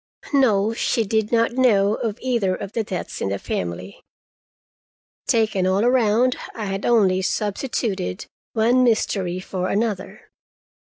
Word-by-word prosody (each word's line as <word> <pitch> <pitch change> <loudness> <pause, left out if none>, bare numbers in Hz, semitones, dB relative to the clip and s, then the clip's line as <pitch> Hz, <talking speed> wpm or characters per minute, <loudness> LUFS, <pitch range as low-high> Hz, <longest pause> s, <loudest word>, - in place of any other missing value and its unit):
No, 225 -6 +3
she 230 0 0
did 220 +1 0
not 230 -1 +3
know 215 -5 +3
of 220 -1 -3
either 235 -8 0
of 200 0 -7
the 225 - 0
deaths 185 -4 -5
in - - -1
the 100 - -1
family. 90 +1 -5 1.3
Taken 215 -5 +2
all 195 +4 +2
around, 245 0 +3 0.2
I 220 - -4
had 195 0 -3
only 195 -6 +3
substituted 205 - -2 0.3
one 240 +3 +3
mystery 195 -6 0
for 185 0 -3
another. 210 0 -3
210 Hz, 130 wpm, -22 LUFS, 190-235 Hz, 1.3 s, No